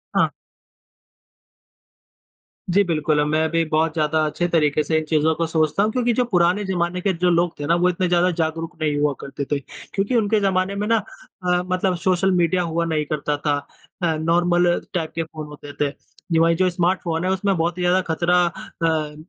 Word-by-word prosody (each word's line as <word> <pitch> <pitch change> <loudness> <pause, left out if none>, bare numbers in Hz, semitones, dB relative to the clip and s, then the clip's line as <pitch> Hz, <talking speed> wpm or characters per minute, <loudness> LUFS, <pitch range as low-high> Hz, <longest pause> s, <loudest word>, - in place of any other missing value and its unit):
हाँ। - - +3 2.4
जी 200 +3 +4
बिल्कुल, 155 -3 +1
मैं 155 +1 +1
भी 165 0 +2
बहुत 155 0 +1
ज़्यादा 155 -1 +1
अच्छे 175 +3 -1
तरीक़े 155 -3 +2
से 160 +1 0
इन 155 - 0
चीज़ों 160 0 +3
को 165 - -1
सोचता 160 +4 +1
हूँ 215 - +1
क्योंकि 240 0 +1
जो 250 +2 +2
पुराने 180 +3 +3
ज़माने 180 -1 -1
के 195 0 +1
जो 180 +1 +1
लोग 170 0 +2
थे 145 - -3
ना 170 - +3
वो 180 +1 +3
इतने 180 +1 0
ज़्यादा 175 +1 +3
जागरूक 165 0 -3
नहीं 150 -2 0
हुआ 145 -1 +2
करते 140 0 -5
थे 145 - +1 0.3
क्योंकि 200 +5 0
उनके 220 -1 +2
ज़माने 190 -1 0
में 210 +1 -2
ना 230 0 +3 0.5
अ, 180 0 +1
मतलब 185 0 0
सोशल 185 +1 +1
मीडिया 180 0 +2
हुआ 170 0 -1
नहीं 155 -2 -1
करता 150 -1 -1
था 150 +3 -3
नॉर्मल 175 +2 +2 0.2
टाइप 165 -3 -2
के 165 - -1
फ़ोन 155 -1 -8
होते 145 -1 -10
थे। 145 - +3 0.4
ये 165 - +3
वही 165 0 +4
जो 185 +1 +2
स्मार्टफ़ोन 175 -1 -1
है 185 - +1
उसमें 190 0 +1
बहुत 170 +2 -1
ही 180 - -3
ज़्यादा 180 +1 +3
ख़तरा 175 +2 +3
अ, 160 -2 -2
170 Hz, 195 wpm, -22 LUFS, 160-180 Hz, 2.4 s, जी